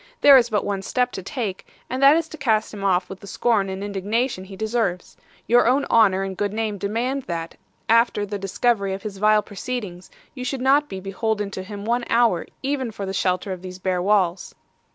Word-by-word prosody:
There 285 -1 +9
is 245 -2 +5
but 210 -3 0
one 200 -1 -2
step 250 +5 0
to - - -6
take, 200 -1 -5 0.2
and 255 +2 -3
that 280 +2 +8
is 330 -1 -1
to - - -8
cast 225 -9 0
him 200 -2 -7
off 185 -2 +2
with 190 - -9
the 200 - -12
scorn 205 -3 +1
and 190 +1 -5
indignation 205 +2 -2
he 195 0 -10
deserves. 215 -3 -2 0.3
Your 240 0 +4
own 270 +3 +3
honour 195 -4 +4
and 195 -1 -4
good 205 +1 -1
name 215 -2 -2
demand 240 +8 -1
that, 165 -1 -4 0.3
after 230 -2 +3
the 205 0 -5
discovery 200 0 0
of 195 - -10
his 200 -3 -6
vile 215 0 +4
proceedings, 200 -4 -6 0.2
you 255 - -7
should 260 +1 -3
not 280 +3 +3
be 190 - -5
beholden 205 +2 -2
to 190 - -5
him 200 +1 -8
one 240 +1 0
hour, 230 -7 +2 0.2
even 265 -2 -1
for 205 -2 -6
the 190 - -4
shelter 185 0 0
of 185 -1 -5
these 185 -1 -8
bare 185 -1 -1
walls. 190 -2 +1
205 Hz, 215 wpm, -23 LUFS, 190-240 Hz, 0.3 s, There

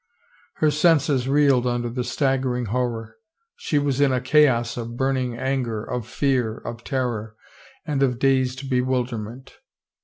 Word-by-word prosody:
Her 155 -1 +2
senses 150 -4 +2
reeled 140 -3 +3
under 120 0 -1
the 125 +1 -3
staggering 130 -2 0
horror. 115 -3 -2 0.4
She 320 - -1
was 145 -1 +1
in 140 -2 +4
a 130 - +1
chaos 130 -3 +3
of 120 0 -6
burning 130 -2 -1
anger, 125 -5 -2
of 125 -2 -4
fear, 125 -3 0
of 120 0 -8
terror 120 -6 -3 0.5
and 145 -4 -1
of 125 -3 +2
dazed 130 0 +1
bewilderment. 125 -1 -2
130 Hz, 140 wpm, -23 LUFS, 120-135 Hz, 0.5 s, in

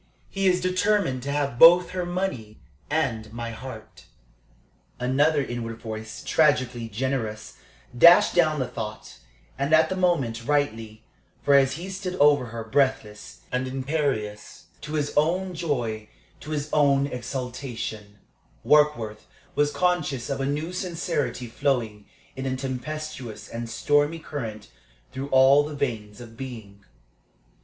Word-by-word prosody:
He 195 -1 0
is 180 -1 +3
determined 185 -6 +1
to 140 +2 -4
have 140 -4 -1
both 175 +2 +8
her 180 -1 -3
money 145 - -3 0.3
and 115 -8 -1
my 115 0 -5
heart." 110 -2 -10 0.9
Another 140 +4 +2
inward 115 -2 -5
voice, 110 -1 -7
tragically 130 -6 +2
generous, 110 -2 -3 0.4
dashed 170 +8 +7
down 155 -3 +3
the 130 -3 -1
thought, 110 -3 -7 0.4
and, 140 +3 +3
at 160 0 +4
the 190 - -2
moment, 140 -11 0
rightly; 115 -6 -1 0.4
for 145 - +3
as 135 -1 +5
he 175 +3 -6
stood 190 -1 -5
over 145 -4 +4
her, 115 0 -6
breathless 110 - -1
and 125 +1 -1
imperious, 130 -6 -3 0.2
to 150 - -7
his 145 -2 -1
own 180 +5 +1
joy, 120 -10 -3 0.3
to 155 - -10
his 150 -1 -3
own 140 -2 +4
exaltation, 125 -5 -5 0.5
Warkworth 150 -8 +2 0.3
was 145 0 +2
conscious 150 -7 -1
of 135 - -2
a 135 - 0
new 150 +5 -2
sincerity 170 -8 -2
flowing 115 -4 -2 0.3
in 135 0 -4
a 130 - -1
tempestuous 130 -2 -6
and 115 0 -6
stormy 145 +7 +1
current 120 -9 -6 0.4
through 135 +1 -5
all 135 +2 +6
the 150 0 -6
veins 110 -7 -3
of 115 -2 -11
being. 110 -6 -9
135 Hz, 135 wpm, -25 LUFS, 115-155 Hz, 0.9 s, both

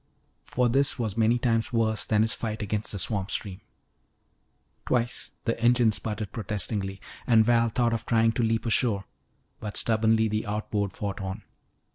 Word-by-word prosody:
For 125 0 +1
this 135 +4 +2
was 110 -5 -2
many 115 +1 +3
times 115 -3 0
worse 110 -2 +1
than 110 -1 +3
his 110 - +2
fight 110 -2 -4
against 105 +1 -2
the 100 - -4
swamp 100 +1 -1
stream. 100 -1 -3 1.3
Twice 120 -1 -1
the 115 -1 -1
engine 120 -1 +4
sputtered 105 -1 -4
protestingly 100 -2 -3 0.3
and 115 -3 +5
Val 115 0 +3
thought 120 +1 +1
of 115 - -4
trying 115 -1 +3
to 115 - -1
leap 115 0 0
ashore. 115 -3 +2 0.6
But 105 -1 -5
stubbornly 110 0 +2
the 110 +1 -2
outboard 105 -1 -2
fought 100 0 -5
on. 95 0 -5
110 Hz, 160 wpm, -27 LUFS, 105-115 Hz, 1.3 s, and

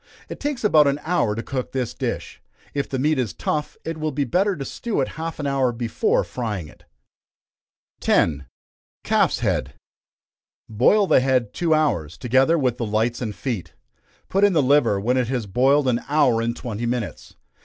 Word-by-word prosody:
It - - -7
takes 290 -4 -3
about 155 -8 +5
an 140 +1 +1
hour 160 -11 +1
to 115 - -4
cook 130 -2 -4
this 130 -3 -2
dish. - - -5 0.3
If 140 -1 -2
the 135 - -2
meat 150 +2 +1
is 115 -8 -1
tough, 150 -1 -3
it 165 -1 -4
will 155 0 -1
be 140 +1 -1
better 190 - +1
to 140 -4 -6
stew 230 - -3
it 135 - 0
half 165 +1 -6
an 145 - -3
hour 135 -3 +1
before 115 -1 0
frying 105 -9 -4
it. - - -18 1.1
10. 70 -4 +1 0.6
Calf's - - +2
Head. - - -1 0.9
Boil 130 - +3
the - - +5
head 130 -4 +1
two 165 -2 +2
hours, 90 - 0
together 130 +7 +3
with 130 -5 0
the - - -3
lights 110 +3 0
and 110 -4 -3
feet. 120 -9 -4 0.5
Put 195 +1 +1
in 205 -2 +5
the 155 -4 +3
liver 130 -7 +3
when 125 +6 +1
it 125 -2 +1
has 125 -3 -2
boiled 135 +8 +2
an 120 -1 +1
hour 140 -6 +3
and 115 +1 -1
twenty 120 -1 -4
minutes. 120 -3 -4
130 Hz, 185 wpm, -22 LUFS, 115-150 Hz, 1.1 s, about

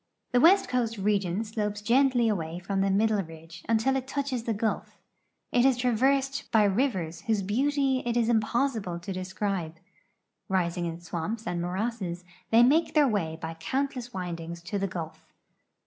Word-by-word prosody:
The 245 - +4
west 365 +8 +6
coast 240 -3 -1
region 200 -1 0
slopes 210 -1 -3
gently 245 +2 +3
awa}"^ 170 -5 -2
from 195 +2 -2
the 195 - +2
middle 210 +1 +2
ridge 165 -1 -11
until 230 +4 +2
it 265 -1 -2
touches 270 -4 -2
the 230 - 0
Gulf 220 +2 -2 0.5
It 245 - +3
is 265 -2 +4
traversed 265 +3 +1
by 220 -2 +5
rivers 190 - 0
whose 215 -3 +1
beauty 270 +5 +1
it 240 0 -1
is 235 -2 +2
imjiossible 225 -4 0
to 190 +3 -5
describe. 185 -2 -3 0.7
Rising 175 -2 0
in 165 +1 -6
swamps 175 +7 -4
and 175 -4 -2
morasses, 185 -1 -3 0.3
they 230 +1 +6
make 310 +8 +3
their 295 -2 +6
way 165 -9 -1
by 160 0 -5
countless 250 - -3
windings 170 -3 -5
to 200 +3 -3
the 195 - 0
Gulf. 165 -4 -6
210 Hz, 165 wpm, -28 LUFS, 180-245 Hz, 0.7 s, west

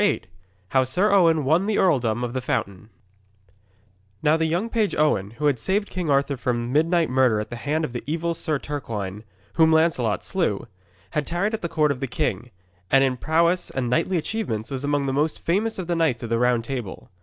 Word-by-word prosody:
VIII 205 - +1 0.5
HOW 130 -1 +3
SIR 180 - +1
OWEN 165 -7 +4
WON 165 +8 +2
THE 215 - +1
EARLDOM 125 - +2
OF 120 -1 -3
THE 130 - -2
FOUNTAIN 100 -4 -3 1.3
Now 150 +1 +4
the 160 0 +1
young 175 +8 0
page 225 -3 0
Owen, 125 -11 +1
who 150 - -2
had 140 -5 +2
saved 200 - -1
King 180 -4 -3
Arthur 140 0 +2
from 120 0 -2
midnight 165 +2 +3
murder 125 -4 +3
at 105 - -5
the - - -4
hand 150 +6 -1
of 125 - -8
the 120 - -5
evil 170 +2 -1
Sir 160 -2 -1
Turquine, 110 -9 -5 0.3
whom 160 -1 +5
Lancelot 160 -9 +2
slew, 165 - -1 0.5
had 150 -1 -2
tarried 185 +6 -1
at 220 - -2
the 170 - -3
court 155 -2 +2
of 135 - -3
the 135 - -2
king, 125 -1 -2 0.4
and 135 0 +5
in 130 -1 +1
prowess 170 +6 +1
and 125 -2 -2
knightly 180 +8 +1
achievements 150 - -3
was 135 0 -4
among 145 -1 0
the 135 - -1
most 150 +3 0
famous 210 +6 0
of 185 - -4
the 175 0 -1
knights 160 -9 +1
of 115 - -5
the 115 - +2
Round 125 -1 +2
Table. 120 -5 -6
145 Hz, 210 wpm, -24 LUFS, 125-170 Hz, 1.3 s, whom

